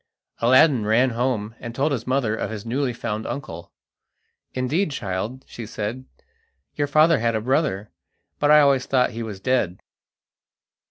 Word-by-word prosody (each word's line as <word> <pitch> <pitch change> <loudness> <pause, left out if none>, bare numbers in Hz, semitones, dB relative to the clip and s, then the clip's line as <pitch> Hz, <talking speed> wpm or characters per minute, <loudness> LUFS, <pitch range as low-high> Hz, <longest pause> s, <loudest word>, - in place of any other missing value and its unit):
Aladdin 130 +1 +5
ran 115 +5 +3
home, 115 -3 -1
and 120 0 -7
told 145 +3 +1
his 125 -4 -3
mother 130 -4 +1
of - - -3
his 110 -1 -7
newly 130 +3 -1
found 110 -2 -4
uncle. 85 -11 -7 0.8
"Indeed, 145 +9 0
child," 110 +1 -4
she 115 -3 -8
said, 110 +5 -5 0.7
"your 145 -1 -1
father 155 +2 +4
had 115 0 0
a 110 - -1
brother, 120 -5 0 0.5
but 145 - +2
I 150 0 +8
always 140 -3 +3
thought 125 -2 +2
he 115 - -6
was 105 -4 -6
dead." 100 -6 0
125 Hz, 155 wpm, -23 LUFS, 110-135 Hz, 0.8 s, I